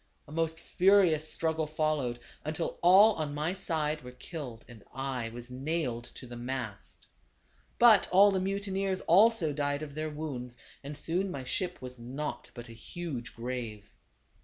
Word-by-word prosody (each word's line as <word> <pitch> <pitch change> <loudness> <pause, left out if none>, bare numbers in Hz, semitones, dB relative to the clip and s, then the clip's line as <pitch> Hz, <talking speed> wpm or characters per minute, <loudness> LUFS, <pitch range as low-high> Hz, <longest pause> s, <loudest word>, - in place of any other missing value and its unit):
A - - -12
most 165 0 -1
furious 180 -5 +4
struggle 160 -1 -1
followed, 155 -5 0 0.3
until 160 +2 -3
all 195 +5 +8
on 150 -2 -3
my 155 +4 -1
side 155 -5 -1
were 125 - -9
killed, 125 -4 -8
and 115 -4 -13
I 135 -3 -3
was 120 +2 -9
nailed 130 -3 -2
to - - -9
the 120 0 -9
mast. 120 -4 -6 0.7
But 230 -4 +6
all 200 +2 +7
the 190 - +1
mutineers 195 0 -1
also 195 -3 +5
died 145 0 -1
of 145 -2 -7
their 155 +1 -3
wounds, 135 -5 -6 0.3
and 145 +1 -7
soon 180 +5 0
my 140 -7 -5
ship 180 +4 -3
was 125 -1 -8
naught 130 +6 -5
but 120 -1 -8
a - - -11
huge 130 +1 -6
grave. 115 -3 -5
150 Hz, 160 wpm, -30 LUFS, 125-175 Hz, 0.7 s, all